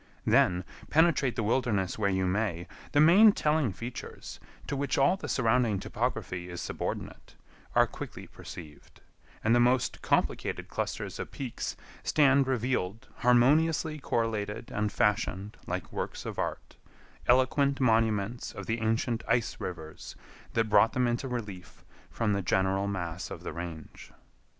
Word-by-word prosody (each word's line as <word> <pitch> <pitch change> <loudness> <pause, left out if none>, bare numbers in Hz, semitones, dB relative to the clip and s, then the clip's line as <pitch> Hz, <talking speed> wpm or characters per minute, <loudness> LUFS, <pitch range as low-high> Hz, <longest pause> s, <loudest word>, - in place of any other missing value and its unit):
Then, 90 +1 +3 0.3
penetrate 155 -5 +3
the 115 - -1
wilderness 110 -5 0
where 100 -2 +2
you 95 -1 +1
may, 90 -3 -1 0.3
the 145 - +3
main 195 +8 +8
telling 150 - +1
features, 115 +7 -8 0.3
to - - -3
which 140 +1 -1
all 140 +7 +4
the 195 - -7
surrounding 115 -4 +2
topography 95 -6 -3
is 85 -1 -6
subordinate, - - -5 0.4
are - - +6
quickly - - -8
perceived, 75 -4 -12 0.4
and 115 - +3
the 120 - +5
most 125 +1 +2
complicated - - 0
clusters - - -4
of - - -4
peaks 130 -4 -5 0.2
stand 140 -2 +4
revealed 115 -5 -1
harmoniously 150 +6 +3
correlated 115 -3 -2
and 105 0 -1
fashioned 100 -1 0
like - - -4
works - - -4
of - - -5
art—eloquent 135 +3 -1
monuments 115 -2 +1
of - - -7
the 115 0 -2
ancient 115 +1 0
ice 115 0 +1
rivers 80 -4 -7 0.4
that 115 -1 +1
brought 105 +1 +4
them 125 -1 +2
into 120 +3 -1
relief 105 -7 -7 0.2
from 110 -3 0
the 100 - 0
general 95 +2 +1
mass 90 -4 -4
of - - -8
the - - -5
range. 85 -2 -8
115 Hz, 140 wpm, -29 LUFS, 100-130 Hz, 0.4 s, main